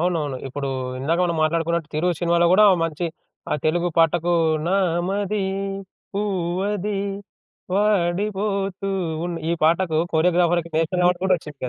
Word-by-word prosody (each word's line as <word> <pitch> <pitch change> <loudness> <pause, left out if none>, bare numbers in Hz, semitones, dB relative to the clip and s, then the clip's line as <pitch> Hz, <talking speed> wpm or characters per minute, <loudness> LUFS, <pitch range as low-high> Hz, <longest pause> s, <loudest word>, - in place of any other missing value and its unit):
అవునవును. 160 -6 -1
ఇప్పుడు 140 +1 -4 0.3
ఇందాక 160 +6 0
మనం 170 -2 -1
మాట్లాడుకున్నట్టు 165 0 0
'తిరు' 170 +4 +1
సినిమాలో 170 0 +3
కూడా 210 +2 +6 0.2
మంచి 165 +1 -2 0.4
ఆహ్, - - 0
తెలుగు 175 +2 +1
పాటకు 170 +1 +3 0.3
నామది 195 +2 0 0.7
పువ్వది 200 +1 -1 0.8
వాడిపోతూ 195 0 0 0.4
ఉన్ 175 -1 -4
ఈ - - +2
పాటకు 165 0 +2 0.2
కొరియోగ్రాఫర్‌కి 170 0 +2
నేషనల్ 170 +3 +1
అవార్డ్ 180 0 +2
కూడా 190 -1 +4
వచ్చింది. 150 -5 -7
175 Hz, 120 wpm, -22 LUFS, 165-195 Hz, 0.8 s, కూడా